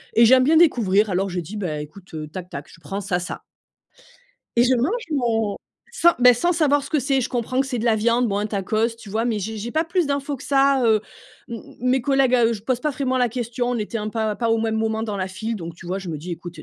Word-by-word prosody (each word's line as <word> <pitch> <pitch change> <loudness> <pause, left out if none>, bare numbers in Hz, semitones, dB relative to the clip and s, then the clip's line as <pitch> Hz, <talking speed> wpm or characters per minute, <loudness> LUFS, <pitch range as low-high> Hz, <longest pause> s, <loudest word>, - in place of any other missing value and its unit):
et 230 +1 +7
j'aime 255 +2 +6
bien 315 +4 +4
découvrir. 215 - +4
Alors 190 +2 0
je 180 0 -3
dis: 195 +6 -7
«Beh, 155 -7 -3
écoute, 175 +4 -12
heu, 155 -1 -5
tac 180 +3 -8
tac, 140 +1 -7
je - - -16
prends 195 +7 -5
ça, 185 -3 -1
ça» 180 - -6 1.1
et 240 - +5
je 255 - +3
mange 335 - 0
mon 225 -7 0 0.3
sans, 345 -5 +4
beh, 250 0 +7
sans 345 +9 +1
savoir 290 -4 +2
ce 280 - -9
que 310 - +2
c'est, 270 0 +1
je - - -2
comprends 245 +1 -2
que 270 - 0
c'est 250 -3 -3
de 225 - -3
la 225 - +4
viande, 235 +3 +2
bon, 200 - -1
un 210 - -1
tacos, 215 +2 0
tu 220 - -12
vois, 220 +3 -1
mais 230 -3 0
j'ai 220 +3 -4
j'ai 225 +3 -5
pas 320 +4 +1
plus 345 -1 0
d'infos 280 0 -2
que 270 - -12
ça. 275 -1 +3
Heu, 220 -2 +4 0.5
m 230 -2 -6 0.2
mes 255 +1 +2
collègues, 270 -1 +3
à 240 -2 +4
eux, 235 - +1
je 210 -3 -6
pose 250 +1 -1
pas 300 - 0
vraiment 260 -1 -1
la 245 -1 +3
question, 245 +1 -3
on 245 - -1
était 215 +2 -3
un 210 - -3
pas 220 -1 -1
pas 230 -2 0
au 225 - +3
même 225 0 -1
moment 220 0 -1
dans 210 -3 -3
la 190 0 -2
file, 220 +4 -4
donc, 170 -3 -7
tu 170 - -13
vois, 185 +2 -2
je 190 - -8
me 155 -3 -4
dis: 175 +3 -6
«Ecoute, 170 0 -8
eh, - - -8
230 Hz, 280 wpm, -22 LUFS, 200-260 Hz, 1.1 s, et